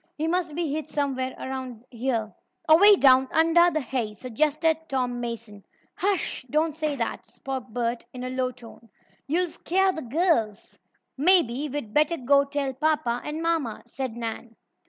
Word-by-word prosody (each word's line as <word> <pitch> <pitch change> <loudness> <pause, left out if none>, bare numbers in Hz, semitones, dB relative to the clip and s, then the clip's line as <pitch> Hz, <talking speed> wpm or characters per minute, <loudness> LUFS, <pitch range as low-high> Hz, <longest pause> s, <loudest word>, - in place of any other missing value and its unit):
"He 310 - -1
must 340 -3 -1
be 325 -4 -2
hid 310 0 -3
somewhere 270 -3 -2
around 260 -3 -6
here." 235 -3 -2 0.3
"Away 395 +7 +8
down 265 -5 +5
under 330 +2 +5
the 310 -2 -1
hay," 235 -4 -3
suggested 300 +7 +1
Tom 250 -2 -1
Mason. 230 -4 -6 0.3
"Hush! 385 -8 -1
Don't 310 +2 +1
say 305 -2 -2
that," 235 -4 -4
spoke 265 -2 -6
Bert 235 0 -2
in 250 0 -8
a 255 - -4
low 255 0 -1
tone. 235 -2 -14 0.4
"You'll 345 +3 0
scare 380 +2 +1
the 320 - -5
girls!" 250 - -1 0.4
"Maybe 300 -4 +4
we'd 255 -6 -5
better 305 +3 +2
go 280 +1 +3
tell 280 -1 -2
papa 260 -4 0
and 310 +2 -4
mamma," 325 -9 -1
said 250 -1 -5
Nan. 230 0 -6
270 Hz, 155 wpm, -25 LUFS, 240-315 Hz, 0.4 s, Away